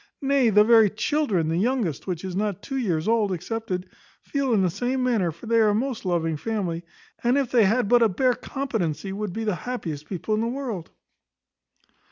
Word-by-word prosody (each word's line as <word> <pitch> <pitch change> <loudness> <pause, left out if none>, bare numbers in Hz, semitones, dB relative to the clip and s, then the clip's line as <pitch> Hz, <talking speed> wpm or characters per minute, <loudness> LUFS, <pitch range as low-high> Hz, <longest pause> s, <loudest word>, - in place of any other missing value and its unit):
Nay, 270 -3 +3
the 210 0 +6
very 225 -1 +6
children, 215 - 0
the 165 +1 0
youngest, 220 - -1
which 180 -1 -3
is 185 -1 -4
not 205 -1 -2
two 270 - -5
years 180 -9 -1
old, 220 -3 +2
excepted, 185 0 -3 0.4
feel 280 -3 -1
in 205 -4 +3
the 180 - +2
same 250 +7 -1
manner; 220 -9 +1
for 170 +6 -13
they 230 0 +3
are 215 -1 +5
a 205 - +2
most 245 -1 -2
loving 165 -3 0
family, 175 -2 -3 0.4
and, 245 +3 +3
if 270 -4 0
they 235 -4 +5
had 225 +3 +2
but 245 +2 +5
a 225 - +5
bare 250 +6 +2
competency, 200 - -3
would 210 -1 -3
be 225 +5 -4
the 210 -2 0
happiest 170 - -5
people 195 +3 -3
in 215 - +1
the 230 - 0
world." 235 -9 -4
215 Hz, 205 wpm, -25 LUFS, 180-245 Hz, 0.4 s, the